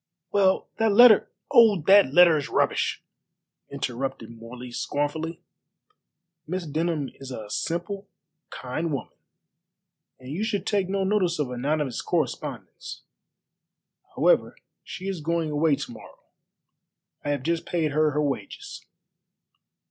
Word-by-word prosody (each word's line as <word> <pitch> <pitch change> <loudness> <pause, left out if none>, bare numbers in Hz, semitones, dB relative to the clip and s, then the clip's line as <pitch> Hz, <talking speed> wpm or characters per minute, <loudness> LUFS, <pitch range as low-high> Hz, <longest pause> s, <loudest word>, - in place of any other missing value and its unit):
"Well, 190 -2 +2
that 225 -2 +2
letter 230 -1 +7
" - - -45
"Oh, 220 -5 +6
that 195 -4 +6
letter 170 +1 +7
is 145 -2 -2
rubbish!" - - 0 0.7
interrupted 130 -3 -4
Morley 120 +2 -10
scornfully. 155 +6 -3 1.0
"Miss 180 +1 -3
Denham 155 -1 -2
is 135 -1 -9
a 110 -5 -7
simple, 195 - -3 0.4
kind 155 +6 -4
woman, 135 -5 -4 1.1
and 130 +1 -10
you 180 +8 -2
should 205 -4 -2
take 200 -3 0
no 195 0 0
notice 190 -3 +1
of 145 -4 -2
anonymous 135 +1 -2
correspondence. 175 -2 -4 1.1
However, - - +2 0.3
she 185 - -8
is 190 -4 -3
going 165 0 -1
away 150 0 +2
to 135 -3 -7
morrow. 115 - -13 1.1
I 145 - -3
have 145 -3 -1
just 165 +2 -1
paid 160 -4 0
her 155 +1 +2
her 150 +1 0
wages." 130 -9 -5
155 Hz, 125 wpm, -25 LUFS, 135-185 Hz, 1.1 s, letter